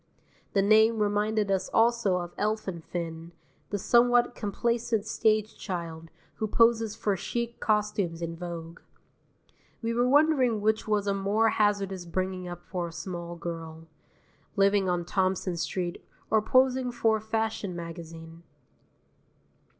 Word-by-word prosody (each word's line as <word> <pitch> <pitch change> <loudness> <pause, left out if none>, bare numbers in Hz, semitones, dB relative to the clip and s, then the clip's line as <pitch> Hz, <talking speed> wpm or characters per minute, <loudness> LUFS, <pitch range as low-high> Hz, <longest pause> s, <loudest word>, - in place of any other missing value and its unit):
The 195 - +3
name 220 +2 +5
reminded 210 0 +1
us 190 -1 0
also 230 -4 +3
of 175 -1 -4
Elfin 210 -5 -2
Finn, 165 0 -6 0.4
the 205 - -1
somewhat 240 +3 +4
complacent 230 0 -1
stage 215 -1 +1
child 165 -4 -6 0.3
who 220 - -1
poses 230 -1 +3
for 205 -2 0
chic 235 +5 -4
costumes 210 -5 0
in 165 -1 -4
Vogue. 170 -1 -7 1.0
We 230 0 0
were 245 +2 +2
wondering 275 -6 +4
which 220 +1 +1
was 210 -2 +1
a 200 - +1
more 205 +3 +2
hazardous 200 -4 0
bringing 185 +1 -2
up 175 -1 -8
for 180 -2 -3
a - - -8
small 170 0 -6
girl, 165 -1 -7 0.7
living 195 -1 +3
on 175 -1 0
Thompson 185 -1 0
Street 175 +1 -3 0.3
or 220 0 +4
posing 255 +2 +3
for 225 -2 +2
a - - -8
fashion 220 -3 -2
magazine. 165 -1 -8
200 Hz, 135 wpm, -28 LUFS, 175-220 Hz, 1.0 s, name